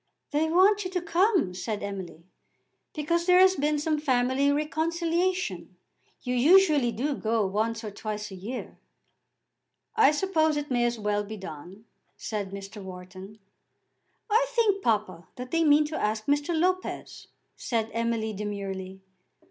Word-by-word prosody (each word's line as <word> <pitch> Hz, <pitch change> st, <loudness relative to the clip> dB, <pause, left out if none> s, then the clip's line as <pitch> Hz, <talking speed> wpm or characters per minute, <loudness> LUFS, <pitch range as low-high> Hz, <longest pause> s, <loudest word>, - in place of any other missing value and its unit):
"They 305 Hz, +2 st, +1 dB
want 390 Hz, +5 st, +4 dB
you 365 Hz, -, -4 dB
to 365 Hz, -1 st, -1 dB
come," 355 Hz, -, +2 dB
said 205 Hz, +4 st, -4 dB
Emily, 190 Hz, -5 st, -7 dB, 0.7 s
"because 335 Hz, +3 st, -1 dB
there 360 Hz, 0 st, +6 dB
has 375 Hz, 0 st, +6 dB
been 300 Hz, 0 st, +1 dB
some 305 Hz, +1 st, 0 dB
family 260 Hz, 0 st, +2 dB
reconciliation. 335 Hz, +5 st, -1 dB, 0.5 s
You 250 Hz, -, -2 dB
usually 295 Hz, -1 st, +5 dB
do 265 Hz, +7 st, -1 dB
go 225 Hz, -4 st, 0 dB
once 220 Hz, +4 st, -1 dB
or 210 Hz, -, -5 dB
twice 210 Hz, 0 st, -5 dB
a -, -, -7 dB
year." 215 Hz, +8 st, -7 dB, 1.2 s
"I 440 Hz, -2 st, +6 dB
suppose 315 Hz, -1 st, +1 dB
it 295 Hz, -1 st, -4 dB
may 240 Hz, -1 st, +2 dB
as 240 Hz, 0 st, 0 dB
well 210 Hz, -1 st, -1 dB
be 215 Hz, +1 st, -7 dB
done," 185 Hz, +3 st, -10 dB, 0.3 s
said 205 Hz, -3 st, -4 dB
Mr. 200 Hz, +1 st, -8 dB
Wharton. 185 Hz, +2 st, -10 dB, 0.9 s
"I 455 Hz, +3 st, +3 dB
think, 445 Hz, -5 st, +2 dB
papa, 205 Hz, -, -1 dB
that 250 Hz, 0 st, -8 dB
they 330 Hz, 0 st, +2 dB
mean 300 Hz, 0 st, +5 dB
to 310 Hz, +1 st, -4 dB
ask 215 Hz, 0 st, -1 dB
Mr. 290 Hz, +3 st, +1 dB
Lopez," 370 Hz, +2 st, -2 dB, 0.3 s
said 225 Hz, -2 st, -2 dB
Emily 230 Hz, -1 st, -1 dB
demurely. 195 Hz, -2 st, -5 dB
250 Hz, 145 wpm, -27 LUFS, 210-330 Hz, 1.2 s, there